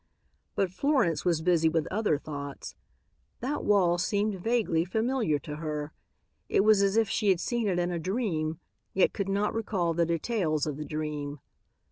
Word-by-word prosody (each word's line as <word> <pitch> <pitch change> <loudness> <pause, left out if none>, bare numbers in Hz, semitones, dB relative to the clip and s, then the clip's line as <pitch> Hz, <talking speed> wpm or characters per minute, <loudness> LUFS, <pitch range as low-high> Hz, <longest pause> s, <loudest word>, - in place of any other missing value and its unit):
But 190 -3 +1
Florence 260 - +1
was 165 -3 +1
busy 165 -2 +3
with 160 -1 0
other 205 -6 +1
thoughts. 140 -1 -7 0.7
That 280 +4 -2
wall 180 -4 +3
seemed 205 0 0
vaguely 220 -7 +1
familiar 220 - 0
to 150 +1 -7
her. 150 -1 -4 0.6
It - - +4
was 215 -1 +5
as 200 +2 +2
if 225 -1 +4
she 215 -2 +1
had 185 -3 +3
seen 235 +2 -1
it 185 -3 +1
in 175 0 0
a 170 - -2
dream, 165 -5 -1 0.4
yet 190 - +3
could 195 -1 -2
not 200 +2 0
recall 195 -7 -1
the 170 0 +1
details 165 -3 0
of 150 -3 -3
the 150 - -5
dream. 150 -2 -4
175 Hz, 170 wpm, -28 LUFS, 155-210 Hz, 0.7 s, was